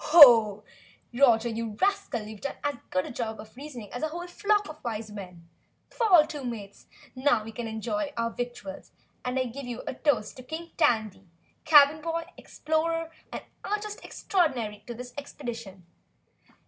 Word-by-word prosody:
"Roger, 240 Hz, -3 st, +5 dB
you 225 Hz, -1 st, -3 dB
rascal, 395 Hz, -, +1 dB
you've 215 Hz, -1 st, -9 dB
done 280 Hz, -, -3 dB
as 290 Hz, 0 st, +1 dB, 0.2 s
good 185 Hz, 0 st, 0 dB
a -, -, -6 dB
job 225 Hz, -2 st, -4 dB
of 215 Hz, +2 st, -11 dB
reasoning 255 Hz, -6 st, -9 dB
as 245 Hz, -, -4 dB
a 315 Hz, -, +1 dB
whole 345 Hz, +3 st, -6 dB
flock 415 Hz, +3 st, +1 dB
of 310 Hz, 0 st, -11 dB
Wise 220 Hz, -2 st, -4 dB
Men! 180 Hz, -5 st, -9 dB, 0.4 s
Fall 375 Hz, -10 st, +5 dB
to, 295 Hz, -2 st, -7 dB
Mates, 210 Hz, -5 st, -7 dB, 0.3 s
now 255 Hz, -4 st, +2 dB
we 225 Hz, -, -8 dB
can 230 Hz, +1 st, -5 dB
enjoy 240 Hz, +7 st, -2 dB
our 230 Hz, 0 st, 0 dB
victuals 240 Hz, -6 st, -6 dB, 0.3 s
and 250 Hz, +1 st, -2 dB
I 260 Hz, -, +2 dB
give 250 Hz, +2 st, -7 dB
you 240 Hz, -1 st, -5 dB
a -, -, -3 dB
toast 250 Hz, -6 st, 0 dB
to 255 Hz, -, -9 dB
King 325 Hz, +5 st, -7 dB
Tandy, 220 Hz, -, +1 dB, 0.4 s
Cabin 295 Hz, 0 st, +7 dB
Boy, 330 Hz, +1 st, -2 dB
Explorer 330 Hz, +1 st, -1 dB, 0.2 s
and -, -, -5 dB, 0.2 s
Artist 420 Hz, 0 st, -3 dB
Extraordinary 240 Hz, -, -1 dB
to 240 Hz, -, -5 dB
this 245 Hz, +1 st, -8 dB
Expedition!" 230 Hz, -10 st, -8 dB
250 Hz, 160 wpm, -28 LUFS, 220-315 Hz, 0.4 s, Cabin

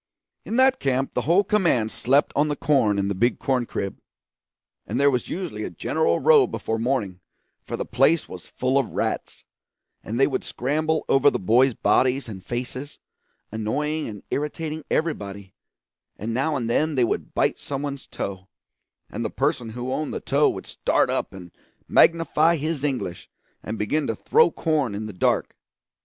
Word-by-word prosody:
In 225 Hz, -, -3 dB
that 260 Hz, +1 st, +4 dB
camp 135 Hz, 0 st, 0 dB
the -, -, 0 dB
whole 185 Hz, +4 st, +5 dB
command 170 Hz, -, +1 dB
slept 140 Hz, +4 st, +2 dB
on 145 Hz, +2 st, +3 dB
the 145 Hz, -, -1 dB
corn 135 Hz, -9 st, +2 dB
in 100 Hz, 0 st, 0 dB
the 100 Hz, -, 0 dB
big 120 Hz, +6 st, +1 dB
corn 125 Hz, -3 st, 0 dB
crib; 100 Hz, -, -4 dB, 0.9 s
and 115 Hz, +5 st, -2 dB
there 140 Hz, 0 st, +5 dB
was 125 Hz, -2 st, -2 dB
usually 185 Hz, 0 st, -4 dB
a -, -, -3 dB
general 470 Hz, -, 0 dB
row 450 Hz, -4 st, +6 dB
before 110 Hz, 0 st, -3 dB
morning, 115 Hz, -7 st, -1 dB, 0.4 s
for -, -, -5 dB
the -, -, -3 dB
place 135 Hz, +7 st, +2 dB
was 90 Hz, -, -10 dB
full 130 Hz, +2 st, 0 dB
of 135 Hz, -, -3 dB
rats, -, -, -3 dB, 0.6 s
and 115 Hz, +3 st, -4 dB
they 135 Hz, -, +6 dB
would 135 Hz, -, -2 dB
scramble 155 Hz, +5 st, -1 dB
over 135 Hz, +1 st, +5 dB
the -, -, -2 dB
boys' 120 Hz, +6 st, +3 dB
bodies 130 Hz, +1 st, +2 dB
and 95 Hz, -4 st, -8 dB
faces, 125 Hz, +5 st, -5 dB, 0.5 s
annoying 150 Hz, +9 st, -2 dB
and 105 Hz, -2 st, -8 dB
irritating 155 Hz, +1 st, -3 dB
everybody; 100 Hz, -, -2 dB, 0.6 s
and 115 Hz, +3 st, -4 dB
now 140 Hz, +5 st, 0 dB
and 120 Hz, -4 st, -2 dB
then 150 Hz, +6 st, +1 dB
they 125 Hz, -, +3 dB
would 115 Hz, -, -2 dB
bite -, -, +1 dB
some 140 Hz, 0 st, -4 dB
one's 140 Hz, -2 st, -5 dB
toe, 95 Hz, -1 st, -6 dB, 0.6 s
and -, -, -5 dB
the -, -, -1 dB
person 120 Hz, -2 st, -1 dB
who 125 Hz, +3 st, -4 dB
owned 155 Hz, -1 st, -2 dB
the -, -, -2 dB
toe -, -, +2 dB
would -, -, -5 dB
start -, -, +1 dB
up -, -, -2 dB
and 90 Hz, -2 st, -11 dB, 0.4 s
magnify 165 Hz, 0 st, +4 dB
his 155 Hz, -1 st, -3 dB
English 130 Hz, -11 st, -3 dB, 0.3 s
and 110 Hz, +1 st, -5 dB
begin 145 Hz, +9 st, 0 dB
to -, -, -1 dB
throw 470 Hz, +1 st, +4 dB
corn 150 Hz, -, -1 dB
in 105 Hz, +2 st, -4 dB
the 110 Hz, -, -7 dB
dark. 90 Hz, -, 0 dB
135 Hz, 175 wpm, -24 LUFS, 110-155 Hz, 0.9 s, row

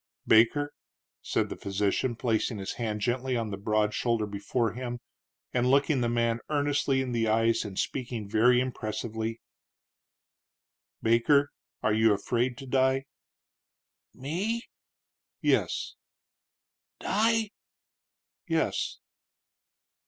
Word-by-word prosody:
"Baker," 130 Hz, +7 st, +4 dB, 0.5 s
said -, -, 0 dB
the -, -, -5 dB
physician, 100 Hz, +5 st, -1 dB
placing 115 Hz, -1 st, 0 dB
his 95 Hz, -1 st, -4 dB
hand 110 Hz, -3 st, -3 dB
gently 125 Hz, +2 st, 0 dB
on 115 Hz, -2 st, -2 dB
the -, -, -2 dB
broad 105 Hz, +1 st, +1 dB
shoulder 115 Hz, -2 st, 0 dB
before 105 Hz, +3 st, -1 dB
him, 120 Hz, 0 st, -5 dB, 0.5 s
and 125 Hz, 0 st, +2 dB
looking 140 Hz, 0 st, +3 dB
the 120 Hz, -, +1 dB
man 115 Hz, 0 st, +1 dB
earnestly 145 Hz, -2 st, +1 dB
in 130 Hz, -, -4 dB
the 115 Hz, -2 st, +1 dB
eyes, 115 Hz, +1 st, +2 dB
and 100 Hz, -3 st, -7 dB
speaking 120 Hz, -5 st, -3 dB
very 120 Hz, +4 st, +4 dB
impressively 115 Hz, -2 st, -3 dB, 1.6 s
"Baker, 140 Hz, +6 st, +4 dB, 0.3 s
are 105 Hz, -, +3 dB
you 110 Hz, 0 st, +4 dB
afraid 120 Hz, +5 st, -1 dB
to 135 Hz, -, -8 dB
die?" 130 Hz, +1 st, +2 dB, 1.1 s
"Me?" 190 Hz, -, -2 dB, 0.8 s
"Yes." -, -, +1 dB, 1.1 s
"Die?" 225 Hz, 0 st, +1 dB, 1.0 s
"Yes." -, -, 0 dB
120 Hz, 110 wpm, -28 LUFS, 110-130 Hz, 1.6 s, Baker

